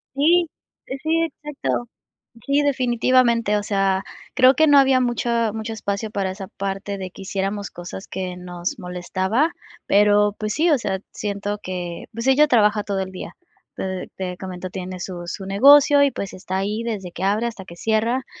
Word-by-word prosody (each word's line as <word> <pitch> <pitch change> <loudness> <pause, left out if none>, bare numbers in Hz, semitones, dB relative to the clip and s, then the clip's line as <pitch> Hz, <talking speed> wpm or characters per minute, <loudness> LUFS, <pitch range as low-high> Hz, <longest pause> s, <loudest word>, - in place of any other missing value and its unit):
Sí, 335 +5 +4 0.4
eh, 265 - -4
sí, 325 +1 +2
exacto. 295 -5 -3 0.6
Sí, 280 +1 +3
definitivamente. 245 -4 +2
O 205 - -2
sea, 195 -2 +1 0.3
creo 260 +1 +6
que 315 +4 +4
no 290 -1 +7
había 265 -1 +4
mucha 235 -2 0
mucho 220 0 -4
espacio 210 0 -3
para 195 -3 -1
esa 190 0 -7
parte 195 +1 -4
de 190 -1 -5
que 195 - -10
hiciéramos 195 +1 -3
cosas 175 +2 -8
que 185 -1 -5
nos 180 0 -5
molestaba, 190 - -1 0.4
pero 205 0 +4
pues 215 -1 -2
sí, 330 +3 +2
o 300 - +5
sea, 190 -5 -2
siento 205 0 -3
que, 175 -2 -5
pues 230 +3 -4
ella 280 +3 +5
trabaja 210 -5 +3
todo 200 -1 -2
el 190 0 -5
día. 185 - -8 0.4
Te 190 -1 -4
te 180 -1 -4
comento, 185 -1 -6
tiene 185 -1 -6
su 175 -1 -6
su 190 +3 -5
negocio, 285 +8 +6
y 280 - +4
pues, 200 - -5
está 185 0 -4
ahí 205 +3 -1
desde 205 -6 -4
que 185 - -6
abre 205 +4 +1
hasta 215 -4 -7
que 170 - -11
cierra, 225 +6 0
205 Hz, 180 wpm, -22 LUFS, 190-250 Hz, 0.6 s, no